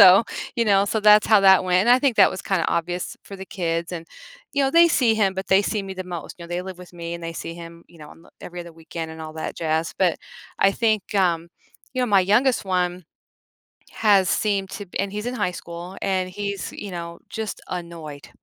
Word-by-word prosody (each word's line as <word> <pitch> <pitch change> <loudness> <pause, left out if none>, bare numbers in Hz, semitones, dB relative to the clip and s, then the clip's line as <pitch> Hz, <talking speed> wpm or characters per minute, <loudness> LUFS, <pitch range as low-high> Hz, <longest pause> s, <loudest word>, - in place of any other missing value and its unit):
So, 195 +2 +9 0.3
you 235 - +2
know, 200 -2 +4
so 220 +2 0
that's 210 0 +6
how 215 -2 +6
that 190 -1 +6
went. 180 0 +3
And 235 - +3
I 250 - +7
think 265 -5 +2
that 195 - +7
was 185 - -6
kinda 185 -4 0
obvious 175 +1 -2
for 200 - -9
the 190 0 -9
kids, 170 -2 -2
and, 165 -2 -6 0.5
you 280 - +1
know, 270 - +1
they 335 +3 +6
see 245 -8 +3
him, 200 -3 +1
but 190 +1 -4
they 190 +1 +5
see 210 0 -1
me 195 -1 -7
the 185 0 -5
most. 175 -3 -7
You 170 - -9
know, - - -11
they 175 +1 -3
live 185 -1 -8
with 180 -1 -13
me, 170 -1 -6
and 170 - -8
they 165 - -4
see 165 - -6
him, 170 0 -11
you 170 - -18
know, 150 -1 -11
on - - -16
the - - -19
every 175 0 -7
other 170 -1 -10
weekend 165 0 -7
and 160 - -10
all 155 0 -7
that 160 - -5
jazz. 160 0 -1
But 185 -3 +2 0.4
I 195 - +4
think, 215 -2 0
um, 170 -4 +1 0.5
you 255 - 0
know, - - +1
my 200 -4 +5
youngest 225 +8 +2
one 180 -1 -1 0.9
has 200 -4 +3
seemed 200 -2 0
to 205 - -7
and 195 0 -1
he's 210 +2 -4
in 245 - -2
high 180 -7 -1
school, 170 +2 -8
and 185 -1 0
he's, 200 0 -4
you 205 - -7
know, 170 -1 -6
just 220 -2 -5
annoyed. 170 -5 -7
185 Hz, 240 wpm, -23 LUFS, 170-205 Hz, 0.9 s, So